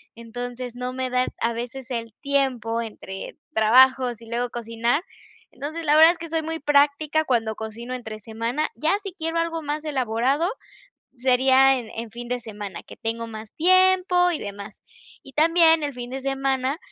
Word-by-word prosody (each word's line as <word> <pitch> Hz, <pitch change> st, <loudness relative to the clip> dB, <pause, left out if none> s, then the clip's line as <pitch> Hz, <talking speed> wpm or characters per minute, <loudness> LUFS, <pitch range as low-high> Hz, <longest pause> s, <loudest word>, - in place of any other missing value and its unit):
entonces 245 Hz, +1 st, -7 dB
no 250 Hz, +1 st, -4 dB
me 255 Hz, 0 st, -2 dB
da 250 Hz, 0 st, +2 dB, 0.2 s
a 230 Hz, -, +2 dB
veces 245 Hz, +3 st, -6 dB
el 230 Hz, -2 st, -4 dB
tiempo 255 Hz, -5 st, 0 dB
entre 195 Hz, -3 st, -8 dB, 0.2 s
trabajos 250 Hz, +1 st, +4 dB
y 230 Hz, -, -13 dB
luego 240 Hz, +1 st, -1 dB
cocinar. 235 Hz, +6 st, -1 dB, 0.5 s
Entonces, 305 Hz, +5 st, -6 dB
la 295 Hz, 0 st, +4 dB
verdad 320 Hz, +2 st, +9 dB
es 350 Hz, -, -14 dB
que 335 Hz, -1 st, -7 dB
soy 325 Hz, 0 st, 0 dB
muy 325 Hz, +1 st, -3 dB
práctica 295 Hz, +2 st, +2 dB
cuando 225 Hz, -5 st, 0 dB
cocino 225 Hz, +3 st, -6 dB
entre 220 Hz, -4 st, -6 dB
semana, 230 Hz, +7 st, -2 dB
ya 310 Hz, -, +1 dB
si 390 Hz, -, -5 dB
quiero 330 Hz, -1 st, -2 dB
algo 330 Hz, 0 st, -1 dB
más 300 Hz, 0 st, -3 dB
elaborado, 265 Hz, +3 st, 0 dB, 0.7 s
sería 260 Hz, +1 st, +4 dB
en 225 Hz, -3 st, -8 dB
en 230 Hz, 0 st, -5 dB
fin 240 Hz, +2 st, -8 dB
de 250 Hz, 0 st, -2 dB
semana, 205 Hz, -4 st, -8 dB
que -, -, -13 dB
tengo 230 Hz, +1 st, -3 dB
más 220 Hz, -1 st, -9 dB
tiempo 365 Hz, 0 st, +4 dB
y 320 Hz, -, -2 dB
demás. 200 Hz, -2 st, -8 dB, 0.4 s
Y 270 Hz, -, -14 dB
también 325 Hz, 0 st, +5 dB
el 285 Hz, -, -2 dB
fin 245 Hz, 0 st, -7 dB
de 265 Hz, -, -4 dB
semana, 270 Hz, 0 st, 0 dB
255 Hz, 175 wpm, -24 LUFS, 230-300 Hz, 0.7 s, verdad